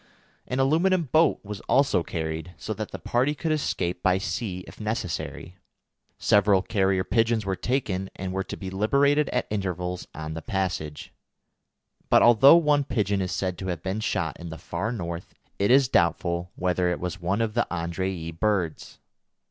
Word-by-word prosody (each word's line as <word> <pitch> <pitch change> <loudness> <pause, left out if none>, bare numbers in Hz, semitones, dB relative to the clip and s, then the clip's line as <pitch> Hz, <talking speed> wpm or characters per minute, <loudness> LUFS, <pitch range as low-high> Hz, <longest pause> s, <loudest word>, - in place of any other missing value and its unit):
An 130 - -2
aluminium 165 +7 +3
boat 155 +4 +3
was 105 -1 -6
also 135 -9 +3
carried, 80 +1 -4
so 65 - -4
that - - -5
the - - -6
party 130 +5 0
could 160 +2 -2
escape 90 - -1
by 95 0 +3
sea 95 -2 -4
if - - -12
necessary. 100 -4 -4 0.6
Several 100 -2 +4
carrier 95 -3 +1
pigeons 115 -1 +1
were 95 -1 -1
taken, 95 -6 -2
and 95 0 -4
were 95 0 -1
to - - -7
be 95 -1 -6
liberated 140 +9 +2
at - - 0
intervals 90 -3 -3
on 80 0 -5
the 80 - -5
passage; 90 -5 -3 1.0
but - - +6
although 120 +7 +8
one 150 -3 +3
pigeon 100 -6 0
is 90 - -2
said 90 -2 -2
to 95 - -5
have 90 -2 -3
been 95 +3 -2
shot 110 - -2
in 85 -1 -7
the 80 - -7
Far 95 +8 -3
North, 85 -6 -6 0.2
it 100 - +2
is 135 +1 +6
doubtful 85 -3 +1
whether 90 0 +1
it 90 - -2
was 90 0 -4
one 95 +5 0
of 115 -2 0
the 120 +1 +1
Andrée 85 -1 -3
birds. 100 -7 -1
95 Hz, 170 wpm, -26 LUFS, 90-120 Hz, 1.0 s, although